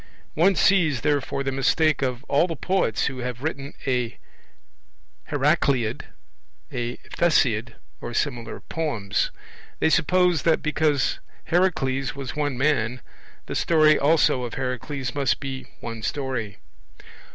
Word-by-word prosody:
One 185 +5 +4
sees, 155 - +3
therefore, 140 0 0
the 135 - -1
mistake 140 +3 +2
of 130 -1 -2
all 145 +4 +2
the 165 - -4
poets 180 - 0
who 135 -2 -3
have 125 0 -5
written 140 -3 -4
a 125 -3 -1 1.1
Heracleid, 140 -5 +1 0.7
a 120 -2 -3
Theseid, 125 -9 +1 0.3
or 120 - -5
similar 120 -4 -2
poems; 115 -12 -1 0.5
they 160 - +3
suppose 180 0 +3
that, 165 +1 +2
because 150 -2 +1 0.3
Heracles 135 -7 +1
was 135 -2 -6
one 145 -3 -1
man, 130 -3 +1 0.4
the - - -5
story 155 -2 +4
also 145 -3 +3
of 120 -2 -5
Heracles 130 0 -3
must 140 -2 +1
be 130 -2 -6
one 115 -1 -6
story. 125 -6 -3
135 Hz, 125 wpm, -24 LUFS, 125-155 Hz, 1.1 s, One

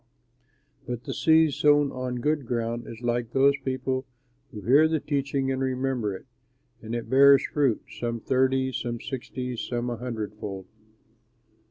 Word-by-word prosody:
"But 120 -1 -4
the - - -4
seed 160 -2 +4
sown 145 0 +3
on 125 -1 -4
good 150 -2 0
soil 120 0 -2
is 115 0 -9
like 120 -1 -1
those 135 +1 +5
people 130 0 -2 0.4
who 110 -6 -9
hear 140 +10 +5
the 160 0 0
teaching 140 -2 -1
and 130 0 -2
remember 130 -5 -1
it, - - -11 0.6
and 115 +1 -5
it 120 - -4
bears 140 +1 +6
fruit; 140 -8 0 0.2
some 115 -1 -2
thirty, 130 +2 +1
some 120 -2 -3
sixty, 130 0 -5
and 120 -2 -4
some 120 0 -3
a 120 - -4
hundredfold. 105 -5 -5
130 Hz, 155 wpm, -26 LUFS, 120-135 Hz, 0.6 s, bears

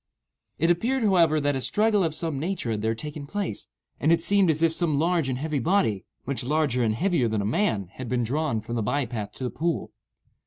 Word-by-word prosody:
It 165 +3 +3
appeared, 235 +9 0
however, 170 -7 +4
that 145 -1 0
a 130 - -2
struggle 210 - +2
of 160 -2 -1
some 160 -5 -2
nature 165 -6 -2
had 105 -1 -2
here 110 +1 0
taken 150 +3 -7
place, 200 +4 -4 0.3
and 155 - +2
it 170 - +4
seemed 200 -3 +4
as 160 +1 +2
if 165 -1 +3
some 160 -4 0
large 165 -2 +1
and 130 - -1
heavy 150 +1 -2
body, 115 - +1 0.2
much 135 -1 -2
larger 140 -2 +1
and 110 -1 +1
heavier 170 - +1
than 110 -1 -1
a - - -2
man, 110 - 0
had 130 +1 -7
been 125 -1 0
drawn 135 -1 -1
from 115 +2 -7
the 115 - 0
by 140 +6 0
path 110 -3 -5
to - - -8
the 125 - -2
pool. 170 +1 -2
150 Hz, 230 wpm, -26 LUFS, 120-170 Hz, 0.3 s, however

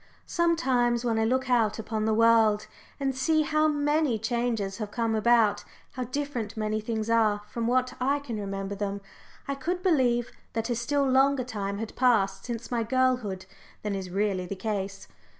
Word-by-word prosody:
Sometimes, 260 -9 +1
when 225 -2 +1
I 220 - +2
look 260 +3 +1
out 225 -4 +2
upon 220 -1 -2
the 220 - +2
world 225 -2 +4 0.3
and 270 -2 -1
see 310 +4 +2
how 305 +1 +2
many 295 -3 +1
changes 225 -3 -1
have 210 -2 -3
come 230 0 -1
about, 220 -2 +3 0.3
how 255 -1 -4
different 255 -4 -4
many 215 0 -1
things 220 0 -3
are 215 -3 +2
from 230 +2 -3
what 255 +1 +1
I 275 +3 +2
can 250 -7 -5
remember 195 0 -4
them, 200 0 -3 0.5
I 280 - -1
could 350 +7 -3
believe 250 -9 +2 0.2
that 225 +2 -2
a - - +1
still 275 +4 0
longer 265 0 +3
time 200 -5 -4
had 220 +1 -6
passed 200 -6 +2
since 235 -1 -5
my 235 -2 +1
childhood 245 -6 0 0.4
than 210 -1 -2
is 190 -2 -4
really 195 -1 -1
the 200 - -4
case. 195 -1 -4
230 Hz, 175 wpm, -27 LUFS, 210-260 Hz, 0.5 s, world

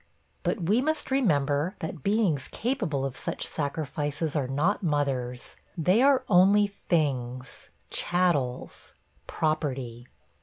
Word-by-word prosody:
But 195 - -1
we 210 +9 +3
must 310 0 -1
remember 150 - +1
that 160 -2 -6
beings 195 - +1
capable 195 - -2
of 135 -1 -4
such - - -3
sacrifices 150 +1 -2
are 140 -4 0
not 150 +10 +1
mothers; 135 -7 -1 0.2
they 180 +8 +3
are 270 -1 +4
only 200 +2 +5
'things,' 135 -10 -2 0.2
'chattels,' 160 -9 -1 0.3
'property.' 135 -6 -2
155 Hz, 110 wpm, -27 LUFS, 135-200 Hz, 0.3 s, only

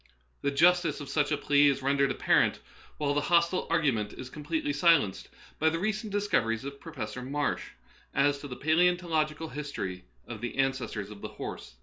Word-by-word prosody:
The 140 - +1
justice 175 +5 +3
of 145 - -7
such 150 -1 +1
a 150 - +2
plea 145 0 +4
is 140 -1 +1
rendered 140 0 +2
apparent, - - +2 0.4
while 145 -1 0
the 145 - +1
hostile 170 +3 +2
argument 135 -11 +1
is 130 0 -9
completely 295 - -2
silenced, 165 - +3 0.3
by 160 - +4
the 165 - -1
recent 215 +3 -2
discoveries 130 - 0
of 140 0 -7
Professor 110 +4 -6
Marsh 145 +3 -2 0.4
as 140 +1 +2
to 145 - -7
the 125 - -7
palaeontological 160 -1 +1
his 150 -1 -5
tory 90 - -5 0.2
of 110 -2 -8
the 120 +2 -4
ancestors 125 -6 -1
of 100 -1 -11
the - - -4
horse. 105 - -8
145 Hz, 180 wpm, -29 LUFS, 130-165 Hz, 0.4 s, plea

